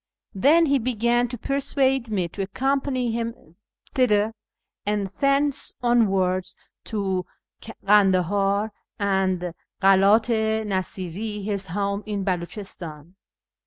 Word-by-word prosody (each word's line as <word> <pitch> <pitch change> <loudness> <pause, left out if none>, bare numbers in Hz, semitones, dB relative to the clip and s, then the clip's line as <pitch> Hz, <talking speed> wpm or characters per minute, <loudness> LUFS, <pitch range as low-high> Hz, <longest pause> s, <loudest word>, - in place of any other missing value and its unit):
Then 295 - +5
he 280 -2 +2
began 240 0 +1
to 245 +1 -6
persuade 270 -1 0
me 190 -5 0
to 195 - -6
accompany 255 +4 0
him 230 -8 -5 0.4
thither, 220 -4 +2 0.5
and 205 -1 0
thence 275 +7 0
onwards 190 -6 +2 0.3
to 190 -4 -2 0.3
Kandahar 200 0 +2 0.3
and 190 -3 0 0.3
Karat 195 +4 +5
i 220 -1 +1
Nasiri, 195 +1 -3
his 200 -1 -3
home 200 +3 -2
in 205 -2 -2
Beliichistan. 175 -3 -5
205 Hz, 100 wpm, -24 LUFS, 190-240 Hz, 0.5 s, Then